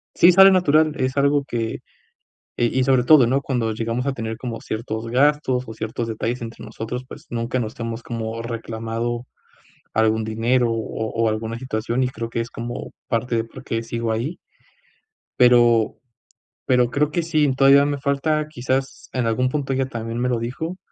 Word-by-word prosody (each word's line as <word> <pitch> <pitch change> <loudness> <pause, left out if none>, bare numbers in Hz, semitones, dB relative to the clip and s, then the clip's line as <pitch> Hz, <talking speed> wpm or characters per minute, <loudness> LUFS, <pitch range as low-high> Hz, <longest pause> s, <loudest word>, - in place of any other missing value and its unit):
Sí 175 - +7
sale 195 +2 +8
natural, 155 -4 +4
es 130 -1 -1
algo 140 0 +3
que 115 -3 -3 0.8
y 120 +2 +1
y - - +3
sobre 130 -2 +4
todo, 135 -1 +6
¿no?, 130 +4 +2
cuando 120 -5 -1
llegamos 115 +4 -2
a 140 - +1
tener 110 -3 -4
como 120 -3 -5
ciertos 110 0 -4
gastos 130 0 +2
o 110 - -8
ciertos 110 +2 -4
detalles 115 +2 -3
entre 115 -1 -8
nosotros, 115 +3 -5
pues - - -11
nunca 120 +2 -2
nos 110 -2 -4
hemos 115 0 -4
como 115 -1 -4
reclamado 115 +1 -4 0.7
algún 110 0 +2
dinero, 115 +2 +1
o 110 0 -3
o 115 0 +1
alguna 110 +1 -3
situación 120 0 -2
y 125 - 0
creo 115 -2 -6
que 115 - -2
es 115 - -4
como 120 +1 -6 0.2
parte 115 +1 0
de 115 - 0
por 115 - -12
qué 115 0 -2
sigo 115 0 -2
ahí. 125 +10 -3 1.0
Pero, 120 -2 +5 0.7
pero 125 -2 +3
creo 145 +4 +1
que 170 - 0
sí, 155 -2 +1
eh, 135 - +2
todavía 140 +1 +6
me 145 -1 -1
falta, 150 +2 0
quizás 130 0 -3
en 125 -3 0
algún 125 +3 +1
punto 135 -1 -2
ella 135 0 +1
también 115 -2 -5
me 125 - 0
lo 120 -2 0
dijo, 160 +10 -4
120 Hz, 185 wpm, -22 LUFS, 115-135 Hz, 1.0 s, sale